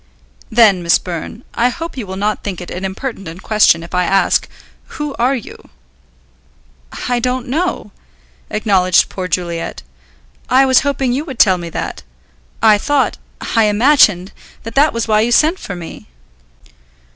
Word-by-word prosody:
"Then, 220 -5 +4
Miss 170 0 +3
Byrne, 180 +7 -7
I 240 +2 +2
hope 330 +6 -6
you 240 -6 -6
will 190 - -6
not 205 +2 -2
think 195 -4 -4
it 180 - -9
an 180 - -6
impertinent 190 -4 -6
question 210 -6 +3
if 170 - -12
I 180 0 +2
ask, 195 +2 +1 0.5
who 295 -2 -4
are 255 +3 +2
you?" 240 - -10 1.4
"I 245 -1 +1
don't 250 +1 -2
know," 325 +8 -2 0.6
acknowledged 190 -4 +2
poor 185 -1 -5
Juliet. 170 - -3 0.7
"I 265 +1 +5
was 260 -1 +5
hoping 275 -3 -1
you 275 +4 -1
would 270 -6 -8
tell 190 -5 +4
me 170 -1 -6
that. - - -5 0.6
I 215 -2 +6
thought, 290 +4 0 0.4
I 225 -1 +4
imagined, 210 -4 +3 0.3
that 225 - -7
that 290 +4 +4
was 230 0 -3
why 215 -1 +3
you 235 +2 0
sent 315 +8 +3
for 195 - -6
me." 170 -2 -10
215 Hz, 155 wpm, -16 LUFS, 185-255 Hz, 1.4 s, I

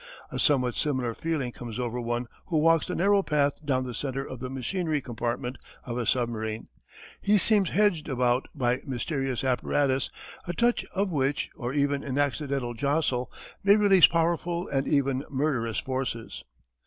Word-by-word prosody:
A - - -4
somewhat 125 -4 +3
similar 130 -5 -1
feeling 150 -3 -2
comes 120 -2 -7
over 125 -1 -2
one 120 +1 -2 0.2
who 165 - 0
walks 165 +1 +4
the - - -3
narrow 200 +2 +4
path 150 -3 0
down 130 -3 +1
the 125 - -5
centre 135 +4 -3
of 130 - -7
the 130 0 -5
machinery 155 +5 -1
compartment 120 0 -3 0.3
of 120 -2 -4
a 120 - -2
submarine. 110 -3 -1 0.5
He 210 +1 +4
seems 200 -1 +3
hedged 190 -6 +2
about 125 -1 +1
by 125 -3 +1
mysterious 135 0 -2
apparatus 130 +1 +1 0.4
a 175 - -2
touch 240 +6 +2
of 195 0 0
which, 140 -2 0
or 120 0 -4
even 140 0 +1
an 140 -1 -3
accidental 140 -3 -1
jostle 135 0 0 0.3
may 200 +1 +7
release 200 -4 +7
powerful 170 +1 0
and 135 0 0
even 140 -2 +1
murderous 130 -6 0
forces. 130 -4 -3
135 Hz, 160 wpm, -27 LUFS, 125-160 Hz, 0.5 s, may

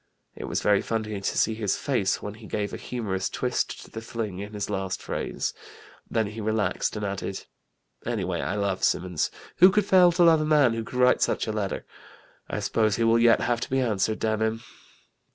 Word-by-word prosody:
It - - -6
was - - -2
very 105 -1 +4
funny 110 -3 -3
to 95 - -2
see 110 - +2
his 105 -3 -1
face 105 -8 0
when 105 - -5
he 110 0 -12
gave 105 -1 -3
a - - -3
humorous 95 -6 -3
twist 125 -1 -2
to - - -18
the 115 - -6
fling 115 -5 -5
in 105 +2 -7
his 100 -1 -3
last 95 -2 -3
phrase. - - -3 0.6
Then 110 -1 +1
he 105 +2 -6
relaxed 105 -3 0
and 105 -1 -3
added: 100 -1 -4 0.6
'Anyway 95 -7 -2
I 95 - -2
love 100 -2 -1
Symonds. 90 -3 +1 0.3
Who 185 - +8
could 205 +1 +2
fail 180 -2 +6
to 175 +1 +4
love 165 -2 +6
a - - +1
man 150 -6 +4
who 115 0 -3
could 125 - -7
write 125 0 +4
such - - +1
a 110 - -2
letter? 100 -3 -3 0.6
I - - -3
suppose 110 -2 +1
he 115 - 0
will 115 +1 +4
yet 115 -1 +5
have 120 -1 0
to - - -5
be 135 - +1
answered, 110 -3 0
damn 110 -1 -1
'im!'" 110 +1 -1
110 Hz, 210 wpm, -26 LUFS, 100-120 Hz, 0.6 s, Who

